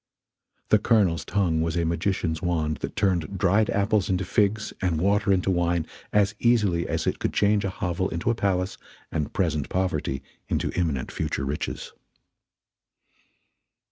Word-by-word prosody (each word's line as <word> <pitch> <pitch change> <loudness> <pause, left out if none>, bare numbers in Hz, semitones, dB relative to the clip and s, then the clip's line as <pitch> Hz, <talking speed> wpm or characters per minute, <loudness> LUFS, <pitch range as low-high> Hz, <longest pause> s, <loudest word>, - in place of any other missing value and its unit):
The 110 - +5
Colonel's 100 -7 +2
tongue 90 -6 +1
was 80 +1 -1
a 85 - +1
magician's 85 -1 -1
wand 80 -4 0
that - - -5
turned 95 -2 0
dried 100 +3 +3
apples 100 0 +1
into 95 0 0
figs 105 +3 +1
and 90 -5 +1
water 100 +3 +2
into 95 0 +2
wine 85 -2 +1 0.3
as 105 -1 +3
easily 105 -8 +2
as - - -1
it - - -1
could - - -1
change 105 0 +3
a 100 - 0
hovel 95 0 -2
into 85 +7 0
a - - +1
palace 95 -4 -1 0.3
and 75 -3 -2
present 80 -7 -1
poverty 75 -7 -1 0.3
into - - 0
imminent 80 -8 -1
future 70 - -2
riches. 70 +2 -4
90 Hz, 150 wpm, -25 LUFS, 85-100 Hz, 0.3 s, The